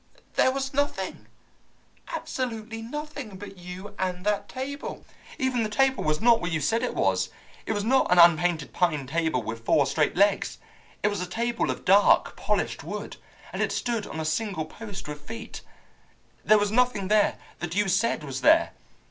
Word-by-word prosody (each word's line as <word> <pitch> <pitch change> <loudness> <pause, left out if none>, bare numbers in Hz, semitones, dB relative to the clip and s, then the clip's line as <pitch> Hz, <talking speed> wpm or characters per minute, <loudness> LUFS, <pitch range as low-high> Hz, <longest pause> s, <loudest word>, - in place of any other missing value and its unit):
There 260 - +4
was 270 +1 -3
nothing, 265 -9 -2 0.8
absolutely 225 - -4
nothing, 285 -4 -6
but 195 0 -10
you 180 +3 -8
and 180 0 -2
that 205 -1 0
table! 275 +2 -6 0.3
Even 260 -2 0
the 215 - -1
table 265 +5 +2
was 155 0 +1
not 235 +2 +5
what 175 -1 -2
you 160 - 0
said 225 +11 +1
it - - -2
was. - - +1 0.4
It - - 0
was 205 -1 -1
not 260 0 +2
an 180 - +5
unpainted 170 -2 +5
pine 155 -6 +1
table 160 -3 0
with 115 +1 -6
four 140 +4 +3
straight 150 +1 +1
legs. 200 +1 +2 0.5
It 210 - +4
was 205 -3 -3
a 180 - -3
table 235 +5 -1
of - - -4
dark 200 +2 +5
polished - - -1
wood, - - -6 0.4
and - - -2
it - - +1
stood 230 -4 -2
on 160 - -6
a 160 - -2
single 165 +1 -1
post 205 +3 -8
with 150 0 -7
feet. 225 +7 -8 0.8
There 215 - +6
was 205 0 +1
nothing 240 -4 +2
there 210 +1 +3 0.2
that 175 0 -4
you 205 0 +2
said 195 -2 +1
was 135 -2 -5
there. - - +5
205 Hz, 180 wpm, -26 LUFS, 170-230 Hz, 0.8 s, There